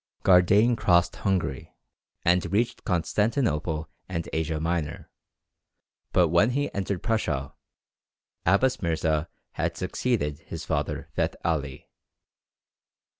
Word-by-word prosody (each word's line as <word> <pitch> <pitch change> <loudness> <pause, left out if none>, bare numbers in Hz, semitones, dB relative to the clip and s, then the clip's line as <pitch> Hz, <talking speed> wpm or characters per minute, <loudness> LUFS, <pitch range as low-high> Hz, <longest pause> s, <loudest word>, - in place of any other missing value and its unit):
Gardane 100 +6 +5
crossed 85 -5 +2
Hungary, 95 -9 -2 0.5
and 85 0 +2
reached 115 +4 0
Constantinople 85 - 0 0.2
and 85 -3 -3
Asia 80 -1 -1
Minor; 80 -2 -3 1.0
but 90 -3 +4
when 85 +7 +4
he 145 +3 -1
entered 100 -2 -2
Persia, 75 - -1 0.9
Abbas 125 +9 +2
Mirza 80 -2 0 0.2
had - - -2
succeeded 80 -13 -1
his 80 0 -8
father 75 -2 -2
Feth - - 0
Ali. 70 -5 -2
85 Hz, 100 wpm, -26 LUFS, 80-100 Hz, 1.0 s, Gardane